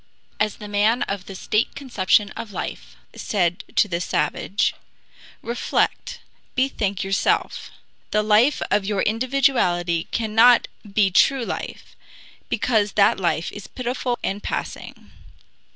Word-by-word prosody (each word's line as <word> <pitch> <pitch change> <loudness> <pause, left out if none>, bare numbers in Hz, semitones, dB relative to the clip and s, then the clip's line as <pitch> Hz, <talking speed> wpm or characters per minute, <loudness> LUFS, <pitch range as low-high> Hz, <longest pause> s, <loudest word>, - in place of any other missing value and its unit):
As 215 - 0
the 210 - -9
man 210 +4 +2
of 195 -2 -5
the 195 - -8
stale 210 +4 +1
conception 210 -6 +1
of 225 - -7
life - - -6 0.2
said 175 -4 -1
to - - +4
the 170 -2 -2
savage: 200 +3 0 0.7
Reflect, 235 +1 -1 0.3
bethink 210 -8 0
yourself! 195 +1 0 0.4
The 210 0 +1
life 215 +7 +3
of 205 0 +3
your 200 0 -1
individuality 220 -9 +1
cannot 230 +2 +4 0.2
be 195 -2 +3
true 260 +6 +3
life, - - -6 0.5
because 215 -4 +1
that 200 -1 +4
life 170 -2 -1
is 205 - -9
pitiful 250 0 -3
and 200 +2 -2
passing. - - -6
210 Hz, 120 wpm, -22 LUFS, 195-235 Hz, 0.7 s, to